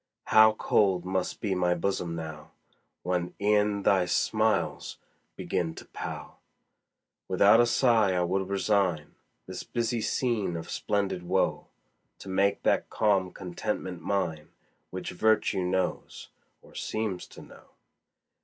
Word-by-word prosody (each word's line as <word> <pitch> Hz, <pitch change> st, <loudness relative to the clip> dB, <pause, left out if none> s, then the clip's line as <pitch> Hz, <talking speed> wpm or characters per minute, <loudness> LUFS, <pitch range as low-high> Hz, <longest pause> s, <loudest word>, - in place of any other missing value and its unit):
How 110 Hz, 0 st, +6 dB
cold 95 Hz, -4 st, +1 dB
must 95 Hz, 0 st, -2 dB
be 100 Hz, -3 st, 0 dB
my 90 Hz, -1 st, +1 dB
bosom 85 Hz, -1 st, -2 dB
now, 80 Hz, -2 st, -7 dB, 0.5 s
When 90 Hz, -1 st, -2 dB
e'en 105 Hz, 0 st, +2 dB
thy 95 Hz, -2 st, +3 dB
smiles -, -, 0 dB, 0.4 s
begin 80 Hz, -3 st, -2 dB
to -, -, -10 dB
pall! -, -, -8 dB, 0.9 s
Without 115 Hz, -, +5 dB
a 120 Hz, -, +5 dB
sigh 115 Hz, -6 st, +3 dB
I 90 Hz, -, +2 dB
would 95 Hz, +2 st, -1 dB
resign 95 Hz, -5 st, 0 dB, 0.3 s
This -, -, -6 dB
busy 120 Hz, -1 st, -2 dB
scene 110 Hz, -8 st, -1 dB
of 80 Hz, -, -7 dB
splendid 100 Hz, -3 st, -1 dB
woe, 90 Hz, -, 0 dB, 0.5 s
To 95 Hz, -, -10 dB
make 100 Hz, +1 st, +1 dB
that -, -, +1 dB
calm 100 Hz, -4 st, +1 dB
contentment 90 Hz, -1 st, -5 dB
mine, 80 Hz, -6 st, -2 dB, 0.4 s
Which -, -, -5 dB
virtue 110 Hz, -3 st, +2 dB
knows, 90 Hz, 0 st, -2 dB, 0.3 s
or -, -, -18 dB
seems 110 Hz, -5 st, -3 dB
to -, -, -13 dB
know. -, -, -16 dB
95 Hz, 125 wpm, -28 LUFS, 90-105 Hz, 0.9 s, How